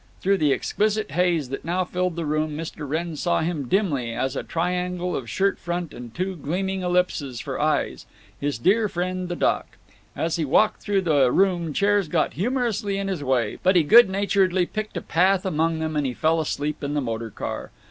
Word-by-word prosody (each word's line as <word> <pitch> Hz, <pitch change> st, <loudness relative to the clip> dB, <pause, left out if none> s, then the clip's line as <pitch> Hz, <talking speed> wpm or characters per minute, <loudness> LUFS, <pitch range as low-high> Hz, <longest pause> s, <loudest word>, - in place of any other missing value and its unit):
Through 195 Hz, +1 st, +2 dB
the 150 Hz, -2 st, +3 dB
exquisite 215 Hz, +8 st, 0 dB
haze 170 Hz, -6 st, +1 dB
that 135 Hz, -, -5 dB
now 180 Hz, +3 st, 0 dB
filled 180 Hz, -1 st, -2 dB
the 170 Hz, -1 st, -3 dB
room 155 Hz, 0 st, -1 dB
Mr. 155 Hz, -2 st, -6 dB
Wrenn 165 Hz, +2 st, -2 dB
saw 175 Hz, +3 st, 0 dB
him 160 Hz, -5 st, -2 dB
dimly, 140 Hz, -, 0 dB
as 130 Hz, +2 st, -1 dB
a -, -, -1 dB
triangle 180 Hz, +1 st, -2 dB
of 120 Hz, -3 st, -4 dB
shirt 195 Hz, +1 st, +1 dB
front 175 Hz, -2 st, -4 dB
and 120 Hz, -1 st, -9 dB
two 185 Hz, +7 st, -3 dB
gleaming 190 Hz, +5 st, -2 dB
ellipses 180 Hz, -8 st, 0 dB
for -, -, -4 dB
eyes…. -, -, 0 dB, 0.3 s
His 145 Hz, -4 st, -1 dB
dear 205 Hz, -, +2 dB
friend, 185 Hz, 0 st, -3 dB
the 175 Hz, -, -2 dB
Doc!… -, -, -1 dB, 0.4 s
As 165 Hz, 0 st, -1 dB
he 165 Hz, -, 0 dB
walked 170 Hz, +9 st, +2 dB
through 200 Hz, -2 st, +1 dB
the 145 Hz, -8 st, +3 dB
room 175 Hz, -3 st, +2 dB
chairs 200 Hz, +2 st, +2 dB
got -, -, 0 dB
humorously 215 Hz, -2 st, -1 dB
in 195 Hz, 0 st, -2 dB
his 180 Hz, -7 st, -3 dB
way, 125 Hz, -5 st, 0 dB
but 185 Hz, +1 st, +3 dB
he 175 Hz, -, +5 dB
good 225 Hz, +7 st, +7 dB
naturedly 190 Hz, -2 st, +2 dB
picked 215 Hz, +3 st, -5 dB
a -, -, -2 dB
path 185 Hz, +3 st, +2 dB
among 165 Hz, -2 st, +1 dB
them, 160 Hz, -1 st, -3 dB
and 135 Hz, -4 st, -1 dB
fell 160 Hz, +1 st, +2 dB
asleep 150 Hz, 0 st, -3 dB
in 145 Hz, +1 st, -2 dB
the -, -, +2 dB
motor 115 Hz, -2 st, -3 dB
car. -, -, -5 dB
175 Hz, 200 wpm, -24 LUFS, 150-190 Hz, 0.4 s, good